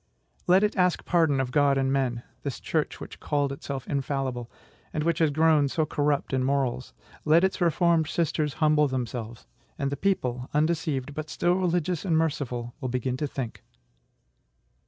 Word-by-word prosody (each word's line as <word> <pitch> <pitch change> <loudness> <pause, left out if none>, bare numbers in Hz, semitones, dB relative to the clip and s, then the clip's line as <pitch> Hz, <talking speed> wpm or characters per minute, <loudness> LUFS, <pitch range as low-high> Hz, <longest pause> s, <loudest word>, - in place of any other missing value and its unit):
Let 185 +3 +5
it 210 - +1
ask 180 -2 +1
pardon 160 -6 +2
of 130 -2 -1
God 140 0 +3
and 135 0 +1
men, 125 -3 0 0.2
this 140 -3 -4
church 155 -2 -2
which - - -9
called 145 -2 0
itself 140 -1 -6
infallible, 135 -4 -2 0.4
and 155 - -2
which 170 0 +1
has 160 -2 +4
grown 155 -1 +3
so 155 +3 0
corrupt 145 -2 0
in 130 -1 +1
morals; 130 -2 -1 0.3
let 160 +3 +4
its 190 0 0
reformed 170 -1 +3
sisters 155 -3 -1
humble 150 -1 +3
themselves,... 120 -3 -4 0.3
and 140 0 -1
the - - -1
people, 130 -10 -1
undeceived, 150 -3 0
but 155 +1 -5
still 175 - +1
religious 180 -2 0
and 170 -5 +2
merciful, 125 -7 -2
will 130 - -2
begin 125 0 -1
to 150 - -1
think. 130 -4 -5
145 Hz, 165 wpm, -27 LUFS, 130-160 Hz, 0.4 s, Let